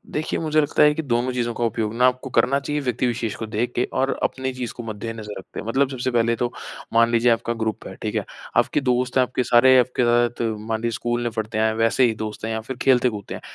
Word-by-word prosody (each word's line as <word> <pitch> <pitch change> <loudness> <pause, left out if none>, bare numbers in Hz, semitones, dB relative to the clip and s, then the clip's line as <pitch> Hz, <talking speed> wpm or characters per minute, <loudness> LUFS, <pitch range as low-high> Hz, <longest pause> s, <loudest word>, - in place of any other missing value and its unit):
देखिए 155 +1 -1
मुझे 155 -1 +2
लगता 145 - +2
है 150 0 +6
कि 160 - -1
दोनों 125 -1 0
चीज़ों 120 -1 -1
का 120 - -3
उपयोग 110 -1 -1
ना 125 +2 +3
आपको 130 +1 -1
करना 135 +2 +2
चाहिए 145 +1 -2
व्यक्ति 125 0 0
विशेष 115 -3 -2
को 110 - -5
देख 110 +3 -2
के 120 - +2
और 135 +1 +1
अपनी 130 0 -1
चीज़ 125 -2 -5
को 120 - -8
मद्देनज़र 110 -1 -6
रखते 95 - -9
हैं। - - -7
मतलब 135 +3 +2
सबसे 130 -1 -2
पहले 115 -1 +2
तो 120 +1 -2 0.4
मान 115 0 +5
लीजिए 120 +1 +4
आपका 115 +1 0
ग्रुप 110 -1 -3
है। - - -9
ठीक - - -3
है, - - -1 0.3
आपके 150 - +2
दोस्त 125 -1 0
हैं - - +6
आपके 125 0 -1
सारे 130 +2 +6
आपके 125 0 +1
साथ 120 0 +2 0.2
मान 110 +1 -3
लीजिए 115 0 -1
स्कूल 120 0 -2
में 120 - -1
पढ़ते 110 0 -4
हैं 110 0 +2
वैसे 115 +3 +2
ही 115 - +2
दोस्त 110 0 -5
हैं 115 - -2
या 110 - -2
फिर 130 - -5
खेलते 125 -1 +4
कूदते 105 -4 -7
हैं। - - -9
120 Hz, 255 wpm, -22 LUFS, 115-130 Hz, 0.4 s, है